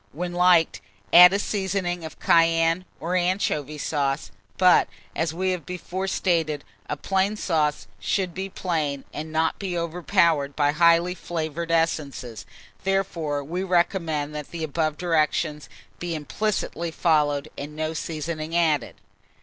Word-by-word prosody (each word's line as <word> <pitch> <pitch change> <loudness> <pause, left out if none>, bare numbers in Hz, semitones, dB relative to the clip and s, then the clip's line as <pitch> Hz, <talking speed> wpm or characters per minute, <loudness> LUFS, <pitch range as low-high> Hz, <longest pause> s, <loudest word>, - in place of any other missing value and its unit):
When 175 +4 -4
liked, 175 -2 +4 0.3
add 180 +1 +10
a 200 - +2
seasoning 190 -4 -2
of 160 - -8
cayenne, 165 +1 +3
or 175 +3 -2
anchovy 175 -5 0
sauce; 140 -1 -1 0.3
but, 185 -1 +5 0.3
as 165 -1 0
we 185 +3 -1
have 180 -3 -3
before 180 +3 -4
stated, 165 -6 0 0.3
a 150 - -2
plain 195 +5 0
sauce 155 -7 0
should 185 -3 -1
be 190 +2 -4
plain, 155 -7 -2
and 155 +1 -6
not 160 +1 0
be 185 -3 -3
overpowered 165 -3 +1
by 145 -1 +3
highly 170 +2 +4
flavoured 165 -2 -4
essences; 145 -9 -1 0.4
therefore 170 -7 -1
we 170 +6 -3
recommend 170 -5 0
that 150 -1 -6
the 170 -2 -5
above 155 0 -1
directions 155 -3 0 0.3
be 175 -1 -3
implicitly 170 +2 -2
followed, 150 -3 +1
and 145 +2 -7
no 155 +1 -2
seasoning 160 0 -4
added. 155 -7 +1
165 Hz, 135 wpm, -24 LUFS, 150-180 Hz, 0.4 s, add